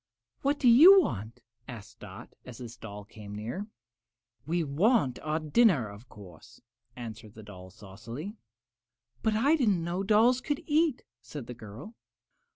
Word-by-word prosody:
"What 285 Hz, +1 st, +1 dB
do 260 Hz, -, +1 dB
you 330 Hz, +12 st, +9 dB
want?" 110 Hz, -, -4 dB, 0.2 s
asked 115 Hz, -5 st, -11 dB
Dot, -, -, -11 dB
as 125 Hz, -3 st, -11 dB
this 120 Hz, -1 st, -9 dB
doll 105 Hz, -2 st, -10 dB
came 105 Hz, -1 st, -11 dB
near. 120 Hz, -, -5 dB, 0.8 s
"We 170 Hz, +1 st, 0 dB
want 155 Hz, -, +1 dB
our 155 Hz, 0 st, -2 dB
dinner, 155 Hz, -, +2 dB
of 105 Hz, +5 st, -13 dB
course," 90 Hz, -6 st, -15 dB, 0.4 s
answered 110 Hz, -3 st, -9 dB
the 110 Hz, -, -11 dB
doll, 95 Hz, -3 st, -12 dB
saucily. 115 Hz, -, -9 dB, 0.9 s
"But 220 Hz, -1 st, 0 dB
I 275 Hz, +8 st, +3 dB
didn't 210 Hz, -, +1 dB
know 175 Hz, +3 st, -3 dB
dolls 225 Hz, +5 st, +3 dB
could 290 Hz, +2 st, -3 dB
eat," 310 Hz, -2 st, +1 dB, 0.2 s
said 120 Hz, +2 st, -9 dB
the 125 Hz, -, -8 dB
girl. 120 Hz, -, -11 dB
140 Hz, 150 wpm, -29 LUFS, -, 0.9 s, you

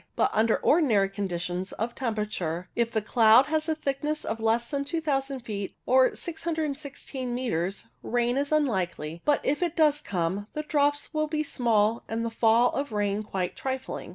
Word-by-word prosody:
But -, -, +2 dB
under 220 Hz, +1 st, +3 dB
ordinary 230 Hz, -, +3 dB
conditions 185 Hz, -2 st, -3 dB
of 230 Hz, +2 st, -3 dB
temperature, 210 Hz, -8 st, -3 dB
if 235 Hz, -1 st, +1 dB
the 220 Hz, -2 st, -1 dB
cloud 225 Hz, +3 st, +6 dB
has 310 Hz, +2 st, -1 dB
a 315 Hz, -, +1 dB
thickness 300 Hz, +1 st, -2 dB
less 225 Hz, +1 st, +1 dB
than 280 Hz, +1 st, -2 dB
2000 280 Hz, -4 st, -2 dB
feet, 205 Hz, -4 st, -5 dB
or 260 Hz, 0 st, +4 dB
616 295 Hz, -6 st, -4 dB
metres, 195 Hz, -7 st, -2 dB, 0.2 s
rain 240 Hz, +1 st, 0 dB
is 280 Hz, +2 st, -1 dB
unlikely, 185 Hz, -, 0 dB
but 290 Hz, -, +2 dB
if 290 Hz, +4 st, +1 dB
it 345 Hz, -2 st, 0 dB
does 300 Hz, -2 st, +3 dB
come, 185 Hz, +2 st, -2 dB
the 305 Hz, -, -3 dB
drops 290 Hz, 0 st, 0 dB
will 310 Hz, 0 st, 0 dB
be 305 Hz, 0 st, -1 dB
small 230 Hz, -5 st, +1 dB
and 230 Hz, +1 st, -2 dB
the 230 Hz, -, -2 dB
fall 230 Hz, +2 st, +4 dB
of 280 Hz, -2 st, -3 dB
rain 205 Hz, -1 st, 0 dB
quite 190 Hz, -4 st, -3 dB
trifling. 265 Hz, 0 st, -4 dB
240 Hz, 165 wpm, -27 LUFS, 210-290 Hz, 0.2 s, cloud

